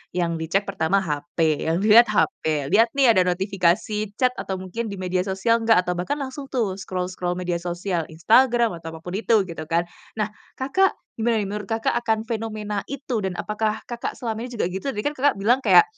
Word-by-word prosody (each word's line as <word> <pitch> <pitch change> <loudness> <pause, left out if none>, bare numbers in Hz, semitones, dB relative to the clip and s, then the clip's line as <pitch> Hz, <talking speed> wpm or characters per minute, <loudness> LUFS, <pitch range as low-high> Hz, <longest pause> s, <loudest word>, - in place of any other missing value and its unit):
yang 170 -2 0
dicek 165 +5 0
pertama 195 -1 0
HP, 150 0 -1
yang 165 +4 +1
dilihat 225 +3 +7
HP, 155 -7 0
lihat 230 +2 +6
nih 265 -4 +6
ada 185 -4 +3
notifikasi 195 +3 0
chat 255 +1 +2
atau 190 - -3
mungkin 190 +5 -5
di 200 - -5
media 185 0 -2
sosial 195 +5 +2
enggak, 225 -5 +4
atau 180 - -2
bahkan 180 +10 -2
langsung 275 -1 -6
tuh 210 -8 -1
scroll-scroll 180 -1 -3
media 175 -1 -2
sosial 175 0 -3
Instagram 235 +8 +3
atau 165 0 -8
apapun 165 +2 -8
itu, 220 -1 +3
gitu 170 -4 -7
kan. 170 +1 +1 0.3
Nah, 215 -1 -1 0.2
Kakak, 375 +9 +2 0.2
gimana 230 +1 +2
nih - - -4
menurut 210 -1 -5
Kakak 225 +1 0
akan 220 -2 0
fenomena 215 -2 -3
itu, 270 -4 -3
dan 190 -3 -3
apakah 215 +4 -2
Kakak 240 0 -5
selama 225 -4 -4
ini 245 - -9
juga 180 -5 -1
gitu? 190 +8 -5
Tadi 210 -6 -2
kan 290 - 0
Kakak 285 0 +2
bilang 220 +6 +2
kayak, 275 - +7
200 Hz, 195 wpm, -23 LUFS, 180-230 Hz, 0.3 s, dilihat